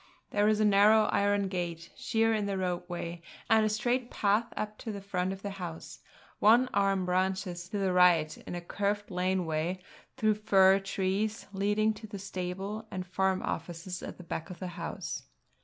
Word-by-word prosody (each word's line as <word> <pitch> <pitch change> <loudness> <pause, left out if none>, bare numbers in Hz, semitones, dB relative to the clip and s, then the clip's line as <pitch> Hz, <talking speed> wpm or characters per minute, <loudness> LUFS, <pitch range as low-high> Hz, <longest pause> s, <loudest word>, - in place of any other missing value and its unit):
There 205 0 +3
is 215 0 +3
a 215 - +4
narrow 210 +2 +6
iron 200 0 +2
gate, 170 -3 -4
sheer 225 -1 +1
in 210 -2 0
the 195 -1 -1
roadway, 175 -2 -3 0.3
and 220 -1 +6
a 215 - +2
straight 240 +3 0
path 210 +3 +1
up 215 0 -4
to 225 - -5
the 200 - -5
front 190 -2 -2
of 195 0 -7
the 200 - -3
house; 165 -2 -7 0.4
one 235 +5 +5
arm 195 -2 +2
branches 185 -1 -1
to 205 - -3
the 190 -2 +1
right 175 -4 +5
in - - -8
a 175 - -4
curved 205 +3 -2
lane 185 0 0
way 160 +3 -1 0.4
through 215 -1 +3
fir 195 -2 +6
trees 195 +3 -1
leading 210 +2 +2
to 215 +1 -10
the 205 -1 -7
stable 195 +3 -5
and 185 -3 -4
farm 190 +1 0
offices 175 +2 -4
at - - -7
the 180 - -10
back 165 +1 -5
of 180 - -8
the 185 - -5
house. 170 0 -5
195 Hz, 185 wpm, -30 LUFS, 180-210 Hz, 0.4 s, narrow